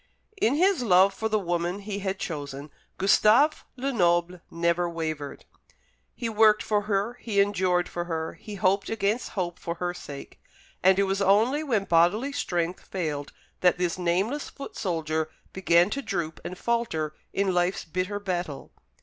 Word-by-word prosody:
In 240 Hz, +5 st, +3 dB
his 370 Hz, 0 st, +3 dB
love 195 Hz, -3 st, +5 dB
for 220 Hz, +3 st, -2 dB
the 215 Hz, -, +2 dB
woman 175 Hz, -1 st, -1 dB
he 200 Hz, 0 st, -5 dB
had 195 Hz, -1 st, -2 dB
chosen 145 Hz, -4 st, -6 dB, 0.3 s
Gustave 215 Hz, +10 st, +5 dB, 0.2 s
Lenoble 180 Hz, -9 st, +1 dB
never 170 Hz, +1 st, 0 dB
wavered. 155 Hz, -4 st, -5 dB, 0.7 s
He 235 Hz, -, -3 dB
worked 215 Hz, -1 st, +4 dB
for 210 Hz, -1 st, +1 dB
her, 210 Hz, +5 st, 0 dB
he 210 Hz, -4 st, 0 dB
endured 185 Hz, -3 st, +2 dB
for 175 Hz, 0 st, -4 dB
her, 160 Hz, -1 st, -3 dB
he 210 Hz, -, -9 dB
hoped 195 Hz, +1 st, +1 dB
against 225 Hz, +1 st, -1 dB
hope 175 Hz, -2 st, -2 dB
for 170 Hz, -, -4 dB
her 175 Hz, 0 st, -2 dB
sake; 145 Hz, -5 st, -10 dB, 0.4 s
and 190 Hz, +1 st, +5 dB
it 200 Hz, -, +4 dB
was 195 Hz, 0 st, -1 dB
only 220 Hz, +9 st, +3 dB
when 235 Hz, -10 st, 0 dB
bodily 195 Hz, +10 st, +3 dB
strength 175 Hz, -10 st, -2 dB
failed 150 Hz, -6 st, -3 dB, 0.3 s
that 180 Hz, -1 st, +4 dB
this 180 Hz, 0 st, -1 dB
nameless 190 Hz, +11 st, 0 dB
foot 275 Hz, -, -9 dB
soldier 160 Hz, -5 st, -1 dB, 0.2 s
began 175 Hz, +1 st, +3 dB
to 275 Hz, -, -2 dB
droop 165 Hz, -, -3 dB
and 180 Hz, -, -6 dB
falter 205 Hz, -11 st, -1 dB, 0.2 s
in 195 Hz, -1 st, 0 dB
life's 180 Hz, +1 st, 0 dB
bitter 185 Hz, +5 st, -2 dB
battle. 175 Hz, -7 st, -4 dB
185 Hz, 160 wpm, -26 LUFS, 170-210 Hz, 0.7 s, love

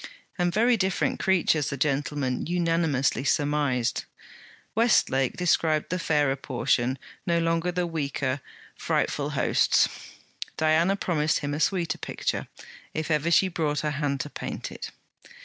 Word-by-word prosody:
And 175 Hz, 0 st, +2 dB
very 230 Hz, +5 st, +3 dB
different 190 Hz, -2 st, 0 dB
creatures! 165 Hz, -6 st, +2 dB
the 140 Hz, -, -4 dB
gentlemen 140 Hz, -2 st, -1 dB
unanimously 165 Hz, -6 st, +1 dB
surmised. 145 Hz, -4 st, 0 dB, 0.7 s
Westlake 170 Hz, -, +2 dB
described 160 Hz, -3 st, +1 dB
the 180 Hz, -, -1 dB
fairer 150 Hz, -4 st, +2 dB
portion, 130 Hz, -1 st, 0 dB, 0.3 s
no 170 Hz, -1 st, +2 dB
longer 165 Hz, +1 st, +1 dB
the 180 Hz, 0 st, -1 dB
weaker; 145 Hz, -4 st, -2 dB, 0.3 s
frightful -, -, -1 dB
hosts. -, -, +3 dB, 0.7 s
Diana 160 Hz, +5 st, +3 dB
promised 160 Hz, -5 st, 0 dB
him 145 Hz, 0 st, -2 dB
a 150 Hz, -, -2 dB
sweeter 170 Hz, 0 st, 0 dB
picture, -, -, -3 dB, 0.5 s
if 155 Hz, +1 st, -2 dB
ever 155 Hz, +2 st, +1 dB
she 190 Hz, +3 st, +5 dB
brought 155 Hz, -5 st, -1 dB
her 150 Hz, -, -1 dB
hand 140 Hz, -2 st, -1 dB
to 145 Hz, -, -7 dB
paint -, -, -5 dB
it. -, -, -7 dB
155 Hz, 130 wpm, -26 LUFS, 140-170 Hz, 0.7 s, she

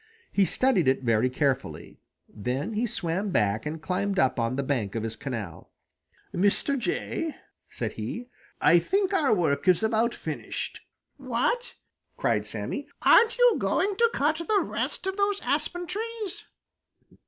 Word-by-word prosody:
He 200 Hz, -, +3 dB
studied 195 Hz, -, +2 dB
it 130 Hz, 0 st, +2 dB
very 115 Hz, +1 st, +2 dB
carefully. 135 Hz, 0 st, -2 dB, 0.3 s
Then 130 Hz, -, -3 dB
he 225 Hz, +3 st, 0 dB
swam 185 Hz, +1 st, -2 dB
back 105 Hz, -, +1 dB
and 160 Hz, +2 st, -4 dB
climbed 195 Hz, +2 st, -1 dB
up 130 Hz, -4 st, +2 dB
on 115 Hz, +2 st, 0 dB
the 140 Hz, -, -1 dB
bank 120 Hz, -8 st, -1 dB
of 115 Hz, -, -2 dB
his 115 Hz, 0 st, -3 dB
canal. 110 Hz, -, -6 dB, 0.6 s
"Mr. 205 Hz, +9 st, +2 dB
Jay," 290 Hz, +4 st, -2 dB, 0.3 s
said -, -, -3 dB
he, 245 Hz, +1 st, -5 dB, 0.3 s
"I 170 Hz, -, +6 dB
think 390 Hz, -, 0 dB
our 310 Hz, -8 st, +3 dB
work 165 Hz, -5 st, +1 dB
is 185 Hz, +3 st, +4 dB
about 225 Hz, +2 st, +1 dB
finished." -, -, -5 dB, 0.4 s
"What!" 270 Hz, -, -1 dB, 0.4 s
cried -, -, 0 dB
Sammy, -, -, -4 dB, 0.2 s
"Aren't 465 Hz, +1 st, +6 dB
you -, -, +6 dB
going 400 Hz, 0 st, +1 dB
to 470 Hz, 0 st, +4 dB
cut 300 Hz, +3 st, +1 dB
the 395 Hz, +5 st, +1 dB
rest -, -, -3 dB
of 385 Hz, +1 st, -2 dB
those 405 Hz, 0 st, +1 dB
aspen 355 Hz, 0 st, -1 dB
trees?" 435 Hz, +1 st, -5 dB
200 Hz, 150 wpm, -27 LUFS, -, 0.6 s, I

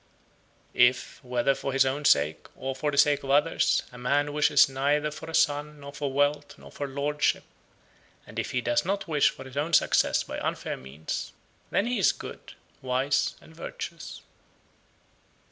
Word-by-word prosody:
84. 120 Hz, -, +7 dB
If, 130 Hz, -1 st, -10 dB
whether 125 Hz, +2 st, +1 dB
for 135 Hz, 0 st, -4 dB
his 135 Hz, 0 st, +4 dB
own 140 Hz, +3 st, -2 dB
sake, 75 Hz, -, +3 dB
or 135 Hz, 0 st, -4 dB
for 150 Hz, +2 st, -1 dB
the 140 Hz, -, -3 dB
sake 145 Hz, 0 st, +4 dB
of 135 Hz, -, -7 dB
others, 145 Hz, +4 st, +3 dB
a 125 Hz, -, -11 dB
man 145 Hz, +4 st, 0 dB
wishes 150 Hz, -1 st, +5 dB
neither 145 Hz, +3 st, 0 dB
for 160 Hz, +2 st, -9 dB
a 160 Hz, -, -3 dB
son, 150 Hz, +1 st, +1 dB
nor 140 Hz, 0 st, -10 dB
for 145 Hz, -1 st, -3 dB
wealth, 145 Hz, +1 st, 0 dB
nor -, -, -14 dB
for 145 Hz, -, -5 dB
lordship, 145 Hz, +2 st, 0 dB, 0.8 s
and -, -, -7 dB
if -, -, -3 dB
he 125 Hz, -, -1 dB
does 120 Hz, 0 st, +1 dB
not 195 Hz, +1 st, -2 dB
wish 150 Hz, -3 st, +3 dB
for 130 Hz, -, -10 dB
his 130 Hz, +1 st, -11 dB
own 155 Hz, +4 st, -1 dB
success -, -, +3 dB
by -, -, -6 dB
unfair -, -, -3 dB
means, 70 Hz, +4 st, -6 dB, 0.4 s
then 200 Hz, -, +1 dB
he 245 Hz, -2 st, -1 dB
is 185 Hz, -, +4 dB
good, -, -, -10 dB, 0.3 s
wise, 130 Hz, +2 st, 0 dB
and 160 Hz, -, -17 dB
virtuous. 170 Hz, 0 st, -7 dB
145 Hz, 180 wpm, -27 LUFS, 130-150 Hz, 0.8 s, 84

